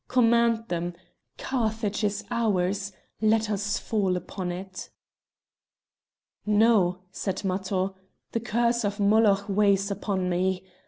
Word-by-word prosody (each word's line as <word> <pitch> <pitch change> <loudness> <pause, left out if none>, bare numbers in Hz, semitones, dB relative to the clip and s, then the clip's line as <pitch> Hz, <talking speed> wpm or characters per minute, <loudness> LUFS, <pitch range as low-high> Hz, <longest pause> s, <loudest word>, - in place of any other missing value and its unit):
Command 235 -2 +3
them! 175 0 -2 0.4
Carthage 220 -4 -2
is 205 0 0
ours; 200 -3 0 0.3
let 220 0 +2
us 205 +1 -1
fall 195 -5 0
upon 180 +1 -5
it!" 185 +1 -7 1.5
"No!" 210 -4 +3
said 195 0 -3
Matho, 190 0 -1 0.4
"the 230 - -1
curse 235 +1 +1
of 205 0 -2
Moloch 205 -1 +4
weighs 200 0 +2
upon 195 -2 -2
me. 185 +1 0
205 Hz, 110 wpm, -26 LUFS, 190-220 Hz, 1.5 s, Moloch